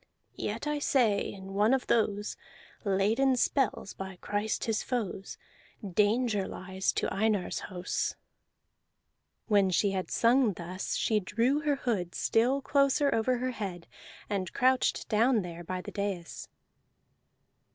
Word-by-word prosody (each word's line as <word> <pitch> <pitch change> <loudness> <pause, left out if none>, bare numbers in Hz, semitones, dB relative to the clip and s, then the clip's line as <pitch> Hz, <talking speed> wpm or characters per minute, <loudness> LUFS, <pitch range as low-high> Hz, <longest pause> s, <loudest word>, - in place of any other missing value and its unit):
Yet 220 +6 -3
I 295 0 -1
say 235 -8 +2
in 195 0 -9
one 210 +6 +4
of 265 - -3
those, 210 -2 +1 0.5
Laid 200 +3 +1
in 270 -1 +4
spells 250 -5 0
by 190 0 -7
Christ 205 +1 -2
his 225 -2 0
foes, 215 -6 -3 0.5
Danger 210 +2 +1
lies 190 +1 -2
to - - -1
Einar's 210 -2 0
house." 180 0 -2 1.3
When 200 -3 +3
she 195 +2 +2
had 190 -1 -3
sung 235 -2 +3
thus, 180 +2 -4
she 215 -2 +2
drew 235 +8 +1
her 295 -1 +1
hood 205 -10 -2
still 255 +5 +2
closer 280 +1 +3
over 245 +3 +1
her 255 +1 -1
head 190 -7 -5 0.4
and 195 -3 -2
crouched 255 +1 +2
down 225 0 +3
there 175 -1 -7
by 185 +2 -4
the - - -8
dais. 200 -4 -4
210 Hz, 135 wpm, -30 LUFS, 190-250 Hz, 1.3 s, one